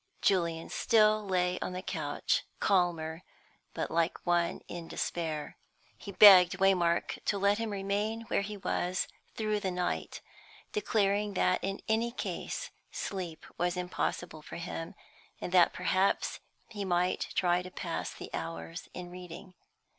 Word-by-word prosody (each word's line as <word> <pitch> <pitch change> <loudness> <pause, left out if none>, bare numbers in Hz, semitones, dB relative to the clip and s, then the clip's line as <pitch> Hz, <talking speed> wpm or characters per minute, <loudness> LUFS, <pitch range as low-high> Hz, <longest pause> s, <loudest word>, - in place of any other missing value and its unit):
Julian 170 -4 +1
still 215 -2 +4
lay 180 -1 +1
on - - -3
the 185 +1 -5
couch, 145 -5 -1 0.2
calmer, 170 -4 +1 0.5
but - - -2
like 165 0 0
one 175 -1 +1
in 170 -1 -7
despair. 160 -4 -3 0.4
He 200 - -9
begged 190 -2 +9
Waymark 180 -3 +2
to 205 - +1
let 200 +2 +3
him 230 -1 -2
remain 205 +3 -1
where 225 - 0
he 205 +1 -5
was 185 -1 -1 0.3
through 215 -1 0
the 195 - -1
night, 180 -1 -2 0.5
declaring 205 - +1
that 180 0 +2
in 195 0 -3
any 225 +2 +2
case 250 - -4 0.2
sleep 180 -5 -5
was 175 +1 0
impossible 175 -2 -3
for - - -10
him, 170 -1 -5 0.4
and - - -5
that 180 -1 +6
perhaps 185 +2 +1 0.3
he 205 -3 -5
might 180 -1 +1
try 175 -1 +3
to 185 - -8
pass - - -4
the - - -9
hours 80 0 -5
in 175 -1 -7
reading. 180 +1 -9
180 Hz, 140 wpm, -31 LUFS, 175-200 Hz, 0.5 s, begged